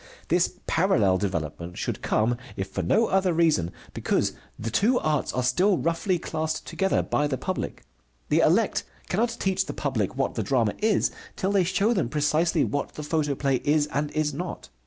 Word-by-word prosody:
This 175 +2 +2
parallel 110 - +3
development 85 -2 -3
should - - -3
come, 115 +3 +1 0.2
if 95 - -3
for 95 - -3
no 215 - +3
other 190 -3 +2
reason, 160 - +2 0.2
because - - 0 0.2
the 115 +1 -4
two 230 - +3
arts 155 - 0
are 125 - -1
still 180 +10 +3
roughly 170 +3 0
classed 160 -1 -3
together 195 0 0
by 145 - +1
the 135 -2 -2
public. 185 +5 -4 0.5
The - - +3
elect - - +3 0.3
cannot 230 +5 0
teach 190 -1 0
the - - -4
public - - -2
what - - 0
the - - -2
drama 115 -6 +1
is 215 -1 +2 0.2
till 190 - -1
they 200 -2 +3
show 195 +6 +2
them 180 - 0
precisely 155 +3 +2
what 145 - -2
the 150 - -5
photoplay 145 -3 0
is 145 +3 +2
and 145 +1 0
is 155 -1 0
not. 175 +5 -6
155 Hz, 180 wpm, -26 LUFS, 130-185 Hz, 0.5 s, parallel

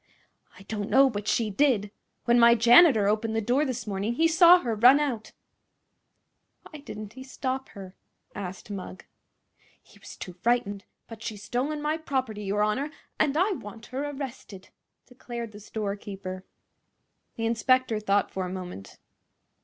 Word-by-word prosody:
"I 190 - -13
don't 205 0 -5
know; 270 0 +5
but 205 -1 -5
she 225 -3 +1
did. 210 -4 +1 0.3
When 240 0 +4
my 235 0 +7
janitor 240 - +6
opened 220 +1 0
the - - +2
door 250 +7 +1
this 250 -4 -4
morning 205 +2 -2
he 325 +5 +3
saw 340 +2 +7
her 235 -3 -2
run 245 +6 +6
out." 250 -7 -3 1.4
"Why 305 - -11
didn't 215 -6 -9
he 260 +2 -10
stop 265 0 -4
her?" 190 -1 -10 0.4
asked 190 +1 -7
Mugg. 185 -1 -8 0.7
"He - - -22
was - - -12
too 180 - -8
frightened. 205 +1 -1 0.2
But 225 -1 -11
she's 210 -3 -6
stolen 275 +8 -2
my 305 +1 0
property, 260 -8 -3
your 205 +1 0
honor, 255 +8 -1 0.3
and 295 -1 +2
I 375 +5 +2
want 225 - -7
her 270 +2 -2
arrested!" 265 -9 -8 0.4
declared 240 -2 -8
the 205 - -11
storekeeper. 200 -3 -6 0.9
The 225 - -3
inspector 235 0 +2
thought 205 -1 +1
for 185 -1 -3
a - - -6
moment. 180 - -8
225 Hz, 155 wpm, -27 LUFS, 205-260 Hz, 1.4 s, my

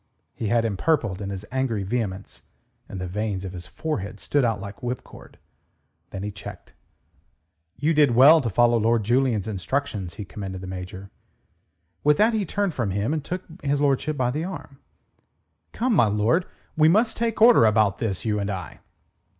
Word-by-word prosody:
He 110 - -4
had 115 +2 +2
empurpled 110 - 0
in 100 - -4
his 100 +1 -6
angry 130 -6 -1
vehemence, 100 -2 -4 0.5
and 95 - -6
the 90 - -3
veins 100 +1 -3
of 95 - -6
his 90 0 -8
forehead 105 - -4
stood 145 -2 0
out 115 -4 +1
like 100 +2 -9
whipcord. 125 0 -7 0.7
Then 95 0 -6
he 105 - -3
checked. 100 - -10 1.0
"You 155 +3 +1
did 145 -6 +4
well 150 +6 +8
to 120 - -2
follow 120 +2 +3
Lord 115 0 +2
Julian's 120 -2 +1
instructions," 100 -3 -3
he 105 - -6
commended 95 +2 -7
the - - -7
Major. 95 +1 -7 0.9
With 150 0 +4
that 225 +2 +4
he 210 -4 -1
turned 200 -1 -1
from 120 -7 -1
him, 100 +8 -1
and 155 -3 -2
took 180 +4 -4 0.2
his 140 0 0
lordship 145 +1 +1
by 125 -2 +1
the 150 +5 -2
arm. 165 -6 -8 0.9
"Come, 245 +1 0
my 120 - +5
lord. 110 - +1 0.3
We 155 0 +5
must 220 +6 +3
take 230 -1 -1
order 225 - +7
about 105 -2 +3
this, 105 -4 -3
you 105 -2 0
and 100 0 -2
I." 95 -3 -6
115 Hz, 175 wpm, -24 LUFS, 100-145 Hz, 1.0 s, well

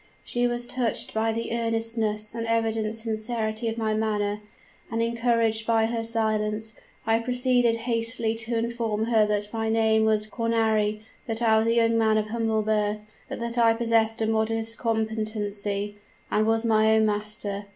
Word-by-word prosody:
She 245 0 0
was 240 0 -2
touched 240 0 -1
by 225 +1 +1
the 230 +1 -3
earnestness 225 -2 -1
and 230 0 -4
evident 225 -1 0
sincerity 220 0 -1
of 225 0 -2
my 220 -1 0
manner; 210 -1 -1 0.5
and, 225 - -2
encouraged 230 -1 +1
by 225 -1 +3
her 230 0 -2
silence, 220 -1 -1 0.3
I 225 0 +3
proceeded 245 -1 +2
hastily 230 -1 0
to 225 +1 -2
inform 225 -2 -1
her 220 -2 +3
that 210 0 -1
my 225 -1 -1
name 220 -1 +3
was 215 -1 +2
Cornari, 220 -2 0 0.3
that 225 +1 -2
I 220 -1 +4
was 220 - 0
a 230 - +3
young 230 0 +3
man 220 -1 +3
of 215 0 -1
humble 225 -1 0
birth, 210 -1 0 0.3
but - - -5
that 235 +1 -2
I 230 -1 +5
possessed 225 -1 +1
a - - +2
modest 225 +1 0
competency, 215 -2 -2 0.3
and 215 +1 +2
was 225 +1 +1
my 220 -1 +4
own 220 0 +4
master. 210 -1 -3
225 Hz, 165 wpm, -26 LUFS, 215-230 Hz, 0.5 s, I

